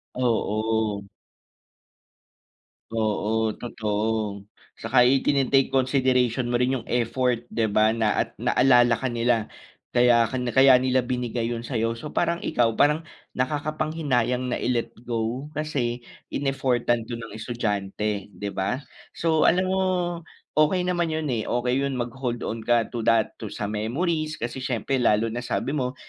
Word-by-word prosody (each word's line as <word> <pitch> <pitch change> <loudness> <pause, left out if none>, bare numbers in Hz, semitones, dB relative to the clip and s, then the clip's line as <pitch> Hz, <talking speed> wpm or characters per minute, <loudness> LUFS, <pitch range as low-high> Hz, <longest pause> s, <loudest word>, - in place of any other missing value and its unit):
Oo. 110 -3 0 1.9
Oo, 110 0 0
totoo. 105 -3 -2 0.3
Tsaka 125 +2 +3
itine-take 135 +1 +3
consideration 130 -2 +2
mo - - +3
rin 130 +1 +2
yung 115 - -9
effort, 120 0 0
di 115 -1 0
ba 110 +1 +3
na 110 -1 +1
at - - -6
naalala 120 -2 +4
ka 130 +3 -1
nila, 115 -2 0 0.4
kaya 120 -2 +4
ka 130 - -3 0.2
kaya 130 -1 +7
nila 130 0 +2
binigay 120 -2 -2
yun 120 0 -4
sa'yo. 115 -2 -1
So 150 +6 -8
parang 170 +1 0
ikaw 115 -6 +1
parang 150 +2 +3 0.3
nakakapanghinayang 145 -3 -1
na - - -3
i-let 120 -2 -1
go 120 +4 -3
kasi 125 -6 -2 0.3
in-effortan 125 -4 0
'to 120 - -3
ng 115 -2 -9
estudyante, 105 -3 -3
di 100 +2 -6
ba? 95 +6 -1 0.4
So 160 -2 +2
alam 180 +2 +3
mo, 190 - +1 0.7
okey 155 +4 +2
naman 175 -2 0
yun 160 -1 -2
eh, 115 -3 -2
okey 125 +2 0
yun 140 -1 -1
mag-hold 120 0 -3
on 115 - -3
ka 115 0 +1
to 120 - -4
that, 115 -1 +2
to 110 - -5
sa 105 +1 -4
memories, 155 +9 -1
kasi 120 +1 -5
siyempre 130 +1 -1
lalo 115 -1 +2
na 120 - -3
sabi 125 +2 -2
mo, 130 -3 -2
120 Hz, 145 wpm, -25 LUFS, 115-135 Hz, 1.9 s, kaya